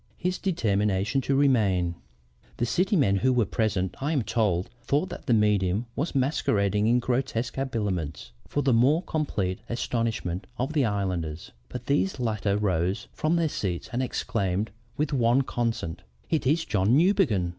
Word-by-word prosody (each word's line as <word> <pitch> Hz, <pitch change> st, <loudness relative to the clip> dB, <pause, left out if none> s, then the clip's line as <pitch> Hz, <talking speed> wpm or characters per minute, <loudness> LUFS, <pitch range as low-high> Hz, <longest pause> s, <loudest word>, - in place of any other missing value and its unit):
HIS 180 Hz, +1 st, -2 dB
DETERMINATION 105 Hz, -, +1 dB
TO 135 Hz, +1 st, 0 dB
REMAIN 105 Hz, -11 st, +3 dB, 0.6 s
"The 120 Hz, -, +1 dB
city 185 Hz, -, +1 dB
men 105 Hz, -, +3 dB
who 130 Hz, +6 st, +2 dB
were 125 Hz, -3 st, +3 dB
present, 100 Hz, -3 st, -1 dB
I 145 Hz, +4 st, 0 dB
am 135 Hz, -6 st, +1 dB
told, 105 Hz, -5 st, 0 dB
thought 145 Hz, +9 st, 0 dB
that -, -, -9 dB
the 120 Hz, -, +4 dB
medium 105 Hz, 0 st, +2 dB
was 155 Hz, +3 st, -2 dB
masquerading 105 Hz, -7 st, +1 dB
in 120 Hz, +2 st, +4 dB
grotesque 125 Hz, -1 st, -1 dB
habiliments 105 Hz, -, -3 dB, 0.2 s
for 145 Hz, -, -1 dB
the 135 Hz, -, +3 dB
more 140 Hz, +9 st, +4 dB
complete 100 Hz, -, -2 dB
astonishment 115 Hz, -6 st, -2 dB
of 135 Hz, +5 st, -2 dB
the 145 Hz, -4 st, +3 dB
islanders, 90 Hz, -7 st, -2 dB, 0.2 s
but 125 Hz, -1 st, -7 dB
these 145 Hz, +4 st, +1 dB
latter 105 Hz, -4 st, 0 dB
rose 95 Hz, -2 st, 0 dB
from 155 Hz, +2 st, +1 dB
their 165 Hz, -1 st, +2 dB
seats 95 Hz, -, -3 dB
and 125 Hz, -, 0 dB
exclaimed 110 Hz, -5 st, -1 dB, 0.3 s
with 150 Hz, +1 st, -1 dB
one 125 Hz, +1 st, +3 dB
consent: 115 Hz, -10 st, -2 dB, 0.3 s
'It 155 Hz, -5 st, +1 dB
is 160 Hz, +4 st, +2 dB
John 105 Hz, 0 st, +2 dB
Newbegin!' 155 Hz, -, +3 dB
115 Hz, 155 wpm, -26 LUFS, 100-135 Hz, 0.6 s, the